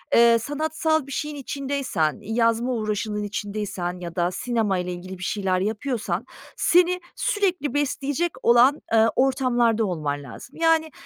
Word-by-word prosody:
eee, 235 0 +6
sanatsal 315 +2 -1
bir 275 - -9
şeyin 300 +1 -3
içindeysen, 270 - -2
yazma 230 +3 +1
uğraşının 215 -2 -2
içindeysen 200 -3 -4
ya 170 -1 -7
da 175 0 +1
sinemayla 195 -4 -1
ilgili 185 +2 -7
bir 180 - -8
şeyler 190 -2 0
yapıyorsan 220 +4 -2 0.3
seni 360 +1 +3 0.2
sürekli 375 - 0
besleyecek 290 +3 -1
olan, 245 +5 +5
eee, 225 0 +6
ortamlarda 245 -4 +2
olman 150 -6 -3
lazım. - - -11
Yani, 325 -1 +2
235 Hz, 130 wpm, -24 LUFS, 200-285 Hz, 0.3 s, eee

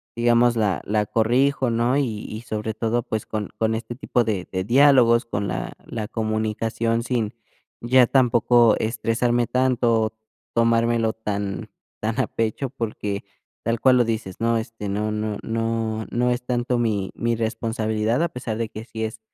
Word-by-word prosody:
digamos, 120 0 +3
la 100 -5 +1
la 105 0 0
corrijo, 125 +4 +2
¿no? 120 +3 +1
Y 115 -7 -1
y 110 +1 -6
sobre 110 -1 -4
todo, 115 +2 0
pues, 110 -2 -4
con 105 -2 -3
con 110 0 +1
este 115 +1 -5
tipo 120 -2 0
de 100 -5 -2
de 95 -1 -2
diálogos, 125 -1 +5
con 100 -3 -3
la - - -3
la 110 -1 -5
comunicación 110 +1 -1
sin 115 -3 -1 0.5
ya 125 +1 +4
tampoco 120 -3 +4
estresarme 120 +1 0
tanto, 120 -4 +2 0.4
tomármelo 115 -1 +2
tan 100 -3 -4 0.3
tan 110 +4 -1
a - - +2
pecho, 115 +4 -2
porque 105 -5 -4 0.4
tal 115 0 0
cual 130 +1 +5
lo 120 - +5
dices, 110 -5 -3
¿no? 115 0 +2
Este, 110 -2 -5
no 105 +2 -1
no 105 -1 -2
no 115 -1 -2
no 125 +1 +1
es 120 +1 -2
tanto 125 0 0
mi 105 -5 0
mi 115 -1 0
responsabilidad, 110 +2 -1
a 170 - +2
pesar 115 -6 -4
de 115 - -1
que 110 0 -8
si 110 -2 -4
es, 110 0 -6
115 Hz, 165 wpm, -23 LUFS, 110-120 Hz, 0.5 s, diálogos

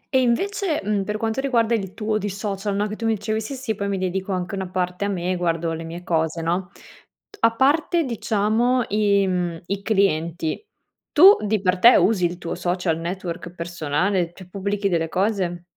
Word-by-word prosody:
E 260 - +5
invece, 340 - 0
mhmm, 205 -1 0
per 210 +1 -2
quanto 225 +4 -1
riguarda 235 -4 +1
il 195 -4 -2
tuo 215 -1 -1
di 205 0 -3
social, 200 0 -3
no, 205 +1 +1
che 215 - -5
tu 225 +1 -3
mi 225 - +2
dicevi: 215 +1 -2
"Sì 250 +6 -5
sì, 255 -4 -3
poi 200 -1 -3
mi 200 - -1
dedico 190 +1 -2
anche 185 0 -3
una 190 -2 -3
parte 180 +1 -2
a - - 0
me, 185 -2 -1
guardo 165 -1 -1
le 165 0 -5
mie 165 +2 -7
cose", 160 -1 -1
no, 175 +2 -1 0.7
a 230 0 +3
parte 310 +6 +2
diciamo 235 0 +1
i 200 -1 +3
mhmm, 175 -3 -2
i 200 +2 -3
clienti, 170 - 0 0.5
tu 380 +7 +9
di 210 0 +1
per 180 -1 +1
te 240 +6 +8
usi 200 -5 +3
il 175 +1 -2
tuo 170 - -5
social 175 -2 -1
network 170 0 -5
personale, 170 +2 -1
cioè 185 - -12
pubblichi 200 +1 -2
delle 165 -3 0
cose? 185 -3 -1
195 Hz, 195 wpm, -22 LUFS, 175-220 Hz, 0.7 s, tu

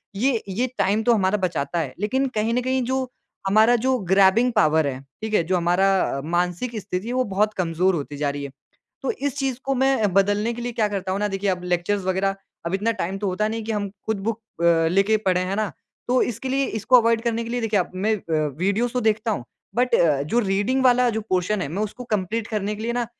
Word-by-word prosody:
ये, 235 +2 +1
ये 230 +7 0
टाइम 205 +3 +2
तो 240 - +4
हमारा 195 -2 +2
बचाता 170 -4 -1
है, 140 -6 -3
लेकिन 260 +7 0
कहीं 220 +2 +1
न 250 - +1
कहीं 260 +1 0
जो, 260 +1 -1 0.4
हमारा 220 +4 +5
जो 260 0 +2
ग्रैबिंग 195 +6 +5
पावर 160 -8 +3
है, 130 -2 -3 0.2
ठीक 220 0 -4
है, 190 - +3
जो 180 +3 0
हमारा 175 +3 +2 0.3
अ, - - -4
मानसिक 180 +8 -1
स्थिति 185 +1 -4
है 245 - -2
वो 255 0 +2
बहुत 210 +2 +2
कमज़ोर 180 0 +1
होती 145 -2 -5
जा 145 0 0
रही 140 0 -4
है। 140 - -6 0.5
तो - - -1
इस 285 - -3
चीज़ 265 -3 -1
को 270 - 0
मैं 265 -6 +2
बदलने 205 +3 +2
के 240 - -6
लिए 245 0 -3
क्या 220 -2 +1
करता 195 -2 -3
हूँ 195 - -2
ना, 210 - +1
देखिए 195 0 -1
अब 180 -1 -3
लेक्चर्स 180 +3 0
वग़ैरह, 190 +1 0 0.3
अब 170 - -1
इतना 210 +4 +1
टाइम 190 +3 -2
तो 205 - -3
होता 200 +3 0
नहीं 225 +1 -3
है 215 - -8
कि 225 - -1
हम 205 -1 -2
ख़ुद 205 +1 -4
बुक 230 0 -2 0.2
अ, 165 -1 +4
लेके 195 +5 +3
पढ़ें, 185 -1 +2
है 190 +2 -2
ना। 215 -1 -1 0.4
तो 250 +1 +3
इसके 240 +3 -3
लिए 270 +1 +1 0.2
इसको 235 +5 +5
अवॉइड 230 0 +2
करने 230 -1 -1
के 230 - -6
लिए 245 0 -1
देखिए 220 -3 +1
अब 180 - -3
मैं 210 +4 +1
अ, 160 -5 -1
वीडियोज़ 200 +7 0
तो 250 - 0
देखता 220 0 +1
हूँ, 195 - -2 0.3
बट 250 0 +2 0.3
जो 235 - +1
रीडिंग 205 +6 0
वाला 250 0 +5
जो 220 -1 -2
पोर्शन 185 +2 +1
है, - - -3
मैं 185 +8 -2
उसको 215 +4 -5
कंप्लीट 215 +2 -1
करने 210 -1 -2
के 215 - -7
लिए 235 +1 -1
ना 240 0 -1
210 Hz, 245 wpm, -23 LUFS, 185-235 Hz, 0.5 s, हमारा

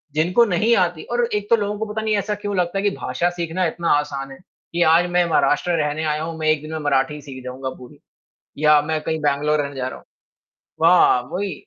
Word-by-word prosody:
जिनको 180 +9 +3
नहीं 215 +5 +2
आती 175 -3 0
और 240 0 +1
एक 205 0 -2
तो 230 - +6
लोगों 205 -1 -2
को 220 - -1
पता 220 - -2
नहीं 215 -1 0
ऐसा 210 +1 -2
क्यों 205 -1 -4
लगता 180 +2 0
है 195 - -1
कि 205 - +3
भाषा 130 +8 -1
सीखना 175 +1 -2
इतना 170 +1 -2
आसान 140 -2 -5
है, 135 - -10 0.4
कि 175 - -1
आज 165 +2 +4
मैं 180 0 +3
महाराष्ट्र 150 +3 +2
रहने 150 +1 -2
आया 155 0 -1
हूँ 165 0 -5
मैं 155 - -1
1 155 -1 +2
दिन 155 +1 -9
में 160 - -3
मराठी 145 0 0
सीख 130 -3 -10
जाऊँगा 130 +1 -5
पूरी 125 -1 -14 0.6
या 150 0 +5
मैं 155 +1 -2
कहीं 160 0 -2
बैंगलोर 150 +1 +1
रहने 140 -1 -6
जा 130 -1 -3
रहा - - -8 0.6
हूँ। 165 - -1
हाँ, 150 -8 +5
वही। 195 +2 -2
160 Hz, 230 wpm, -21 LUFS, 145-185 Hz, 0.6 s, तो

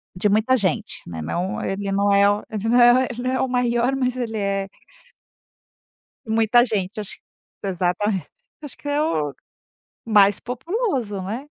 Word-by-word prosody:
de 200 +3 +1
muita 220 +6 +3
gente, 210 +1 -2
né, 80 -2 -6
não 175 - -3
ele 195 0 -3
não 200 +1 +2
é 200 0 +5
o 205 +1 0
ele 215 0 -4
não 240 +1 +4
é 240 0 +8
o 255 - +4
ele 245 0 -6
não 255 - 0
é 260 - 0
o - - +1
maior, 245 +1 +1
mas 255 -1 -1
ele 225 -3 -3
é 195 -1 -1 1.6
Muita 225 +2 +3
gente. 205 -3 -3
Acho 210 - -7 0.5
exatamen 190 +1 -1 0.4
acho 290 - -9
que 290 - -10
é 290 +1 +1
o 150 - -1 0.7
mais 205 -3 +4
populoso, 255 - -2
né. 225 +9 -5
220 Hz, 165 wpm, -22 LUFS, 195-245 Hz, 1.6 s, é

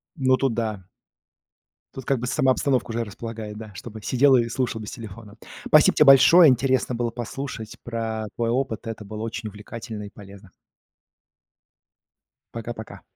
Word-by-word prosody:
Ну 130 -3 +2
тут 135 -4 0
да. 110 -5 -3 1.1
Тут 130 - -8
как 135 -1 +1
бы 125 - -4
сама 130 0 +2
обстановка 130 -3 0
уже 115 +1 -2
располагает, 110 0 -7
да, 110 -1 -9
чтобы 110 +3 -9
сидел, 135 +4 +4
а, 125 - +5
и 115 - -3
слушал 120 -2 -2
без 105 - -7
телефона. 110 -2 -10 0.3
Спасибо - - +5
тебе 150 - +5
большое, 155 +5 +8
интересно 130 -1 +1
было 120 0 -1
послушать 120 -1 -6
про 115 -2 -4
твой 115 -1 -1
опыт. 120 -2 -2
Это 110 -1 -6
было 105 +1 -7
очень 115 0 -5
увлекательно 105 +1 -8
и 100 - -8
полезно. 100 -2 -14 2.0
Пока-пока. 115 -1 -7
115 Hz, 155 wpm, -24 LUFS, 110-130 Hz, 2.0 s, большое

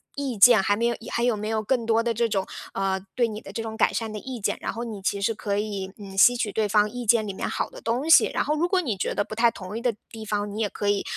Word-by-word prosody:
意 275 -5 -3
见 225 +2 +8
还 205 +1 +2
没 230 +3 -1
有 235 0 +1 0.2
还 235 - 0
有 245 -2 +2
没 210 +1 -4
有 220 0 -1
更 235 +1 0
多 225 0 +2
的 235 0 0
这 230 +1 +1
种 195 -3 -1 0.3
呃， 195 0 -1 0.2
对 240 -2 +2
你 215 -1 -6
的 - - -11
这 225 - -3
种 220 0 -6
改 - - +3
善 225 -2 -3
的 215 - -5
意 255 +2 -7
见， 200 - 0
然 - - -2
后 230 - -5
你 220 -4 -6
其 200 +1 -1
实 215 +3 +1
可 200 -1 -3
以， 200 -2 -3
嗯， 200 -2 -10
吸 245 +5 +7
取 225 -4 -1
对 215 +1 0
方 210 +1 +4
意 245 +2 -6
见 220 0 +4
里 200 - -4
面 - - -4
好 - - -2
的 - - -11
东 240 +6 -1
西。 325 - +8
然 - - +1
后 300 - 0
如 330 +3 +1
果 370 0 +2
你 245 - -2
觉 - - -2
得 - - +1
不 215 - -9
太 230 +2 +4
同 195 -2 -8
意 - - -5
的 240 -3 0 0.2
地 220 -1 -8
方， 205 -1 -2
你 215 - -5
也 220 - +1
可 205 - -4
以， 205 -1 +1
220 Hz, 340 characters per minute, -25 LUFS, 205-235 Hz, 0.3 s, 见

